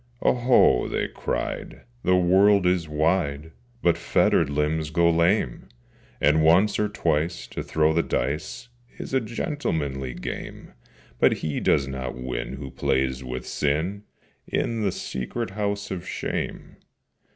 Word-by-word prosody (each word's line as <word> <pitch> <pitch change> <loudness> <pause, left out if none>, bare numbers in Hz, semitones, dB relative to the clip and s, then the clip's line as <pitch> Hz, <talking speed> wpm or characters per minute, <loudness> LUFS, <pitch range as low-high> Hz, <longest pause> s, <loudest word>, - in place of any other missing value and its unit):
'Oho!' 120 - +4
they - - -1
cried, - - -4 0.2
'The 90 - +4
world 95 +2 +4
is 90 -3 +1
wide, 75 -1 0 0.3
But 85 -1 +3
fettered 85 -4 +2
limbs 75 +2 0
go 85 +2 +3
lame! 85 - +1 0.5
And 75 +2 +4
once, 90 +6 +4
or 105 0 +1
twice, 85 -6 -1
to - - -5
throw 80 0 +1
the 85 - +3
dice 75 - -3 0.3
Is - - -7
a 130 - +3
gentlemanly 75 - -3
game, - - -7 0.5
But - - +5
he 75 - -1
does 70 -2 +2
not 65 -1 -5
win 65 0 -4
who 65 -1 -7
plays 65 0 0
with 65 0 -5
Sin 80 +8 -1 0.5
In 115 -1 -1
the 100 -2 +1
secret 90 - -4
House 100 0 -3
of 90 -3 -5
Shame. - - -4
80 Hz, 135 wpm, -25 LUFS, 70-100 Hz, 0.5 s, But